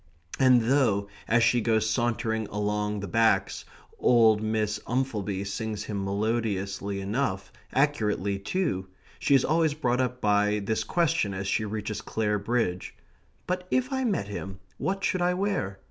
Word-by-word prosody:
And 130 -2 +6
though, 115 -6 +2 0.2
as 120 +1 +3
she 120 +1 +3
goes 110 -1 +2
sauntering 110 -1 0
along 105 0 -2
the 100 - -4
Backs, 95 -2 +1 0.3
old 110 -3 +5
Miss 110 -1 -1
Umphelby 105 -6 -1
sings 105 +1 -4
him 100 -3 -4
melodiously 100 -1 -1
enough, 100 0 -2 0.2
accurately 105 - +1
too, 100 - -2 0.3
she 140 - +3
is 135 - +4
always 160 -1 +2
brought 125 -4 +1
up 125 0 -2
by 105 -1 +2
this 105 +2 -1
question 165 - +1
as 100 +1 -4
she 110 +2 0
reaches 105 0 -4
Clare 105 -2 -1
Bridge: 100 -4 -1 0.5
"But 180 0 -3
if 255 +1 0
I 265 0 0
met 200 - 0
him, 95 -2 -6 0.2
what 195 0 -2
should 185 - +1
I 180 0 +2
wear?" 180 - -1
110 Hz, 150 wpm, -27 LUFS, 100-130 Hz, 0.5 s, And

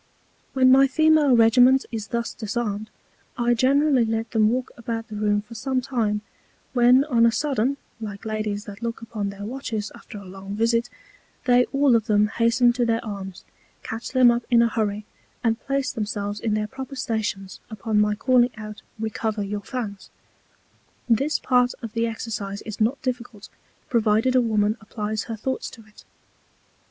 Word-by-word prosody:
When 260 -1 +5
my 270 +1 +7
Female 305 -1 +4
Regiment 245 +4 +5
is 220 -2 -4
thus 235 0 -3
disarmed, 215 -1 -3 0.5
I 240 0 +2
generally 270 +2 +3
let 225 0 -2
them 215 -2 +3
walk 250 +2 -2
about 230 -1 -5
the 215 - -7
Room 205 0 +1
for 225 +2 -13
some 260 +3 -1
Time; 225 -5 -1 0.5
when 250 +1 +5
on 245 -6 +2
a 230 - +6
sudden 275 0 0 0.2
(like 210 -1 -7
Ladies 215 -1 -3
that 205 +1 -10
look 230 -1 -4
upon 210 -3 -4
their 200 0 -7
Watches 225 -3 -4
after - - -11
a 200 - -10
long 195 +2 -8
Visit) 230 +2 +1 0.6
they 245 0 +5
all 275 -3 +3
of 225 -1 +1
them 210 -1 +3
hasten 235 +2 +3
to 245 0 0
their 230 -1 0
Arms, 195 -3 -7 0.4
catch 225 +1 -5
them 255 -2 +5
up 235 0 -1
in 235 -1 +5
a - - +3
Hurry, 210 -2 -2 0.4
and 225 -1 +1
place 275 -1 0
themselves 205 -1 -3
in 215 -2 -1
their 215 0 0
proper 265 +5 -8
Stations 215 -6 -3
upon 220 -1 0
my 210 0 +2
calling 245 +2 +3
out 215 -1 -8 0.2
Recover 220 -1 -2
your 205 +1 -4
Fans. 205 -4 -6 1.0
This 270 +6 +2
Part 250 -1 +2
of 225 -2 -6
the 230 0 0
Exercise 210 -3 -5
is 215 0 -7
not 240 +6 +2
difficult, 245 -5 -5 0.4
provided 230 +1 +2
a 255 - +5
Woman 215 -1 +1
applies 215 -1 -4
her 230 - -5
Thoughts 260 +5 -3
to 225 - -14
it. 215 -1 -19
230 Hz, 170 wpm, -24 LUFS, 210-250 Hz, 1.0 s, my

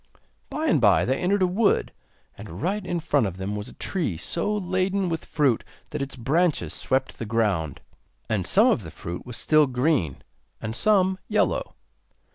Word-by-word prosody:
By 310 - -3
and 200 - +3
bye 95 -6 +5
they 130 +7 0
entered 190 +2 +2
a - - +4
wood, 200 +4 +1 0.4
and 85 +3 -9
right 200 +3 0
in 175 -2 -2
front 145 -7 +1
of 95 -1 -6
them 95 +2 -3
was 105 +1 -5
a - - -13
tree 160 - -2
so 170 - -2
laden 185 0 0
with 165 -2 -3
fruit 140 -7 +1 0.3
that 150 - -3
its 140 0 -4
branches 155 +7 +1
swept 130 0 -1
the - - -3
ground. 100 -10 0 0.5
And 100 -5 -1
some 210 - +5
of 250 - +3
the 80 - -8
fruit 85 +5 -7
was 125 -2 -3
still 155 -1 +4
green, 125 - 0 0.4
and 110 +1 -4
some 190 - +3
yellow. - - 0
140 Hz, 180 wpm, -25 LUFS, -, 0.5 s, bye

